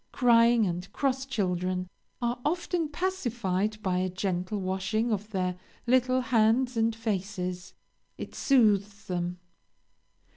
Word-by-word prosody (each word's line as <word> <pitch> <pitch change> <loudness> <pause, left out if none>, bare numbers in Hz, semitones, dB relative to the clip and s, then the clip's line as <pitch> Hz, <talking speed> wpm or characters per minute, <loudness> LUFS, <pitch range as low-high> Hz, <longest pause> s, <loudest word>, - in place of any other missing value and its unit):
Crying 235 -2 +5
and 180 +1 -4
cross 270 -1 -1
children 185 -5 -1 0.4
are 240 +1 0
often 345 0 -1
pacified 235 - -1
by 180 -1 +1
a 185 0 0
gentle 185 +2 -2
washing 195 +5 -1
of 210 0 -2
their 185 -3 -1 0.3
little 255 +1 +3
hands 245 +1 +2
and 225 0 +1
faces 190 -4 -3 0.4
it - - -7
soothes 210 -6 +2
them. 175 -1 -2
215 Hz, 115 wpm, -28 LUFS, 185-245 Hz, 0.4 s, Crying